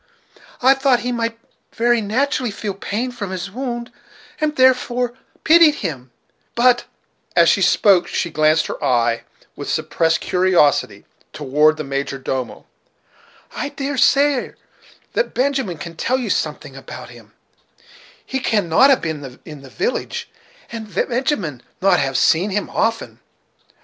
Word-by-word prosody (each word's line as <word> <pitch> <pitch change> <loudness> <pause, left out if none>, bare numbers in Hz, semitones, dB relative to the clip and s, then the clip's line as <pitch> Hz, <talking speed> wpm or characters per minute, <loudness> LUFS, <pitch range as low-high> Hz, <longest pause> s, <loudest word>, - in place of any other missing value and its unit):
I 265 +1 +7
thought 270 -3 +2
he 250 - -2
might 230 -1 -2 0.4
very 240 0 +2
naturally 245 +4 0
feel 205 0 -4
pain 215 +6 -3
from 210 -5 -6
his 190 +1 -5
wound, 240 0 -5 0.5
and 305 0 -1
therefore 250 -1 +2 0.3
pitied 320 -2 +6
him; 130 -6 -5 0.5
but" 245 0 +3 0.5
and - - +6
as - - +4
she - - +2
spoke 195 -4 +4
she 170 - -2
glanced 155 +1 +3
her - - -6
eye, 120 -2 +1 0.3
with - - -7
suppressed 165 -1 0
curiosity, 180 -5 +2 0.3
toward 150 +2 +2
the 155 - -4
major 140 0 -3
domo 130 -2 -4 0.9
"I 285 - -3
dare 285 -1 -4
say, 280 0 +3
sir, - - -19 0.6
that - - -1
Benjamin 260 - 0
can 165 +2 -8
tell 255 +9 0
you 255 - -2
something - - -3
about - - -10
him, - - -16 0.9
he 265 - -3
cannot 215 0 +3
have 270 - +4
been 145 -6 -6
in 150 -4 -10
the 135 - -13
village, 470 - -3 0.4
and 220 -2 -7
Benjamin 235 - -1 0.2
not 195 +1 +3
have 135 -2 0
seen 175 +9 +3
him 205 +1 -3
often." 225 +1 -1
215 Hz, 145 wpm, -19 LUFS, 155-255 Hz, 0.9 s, I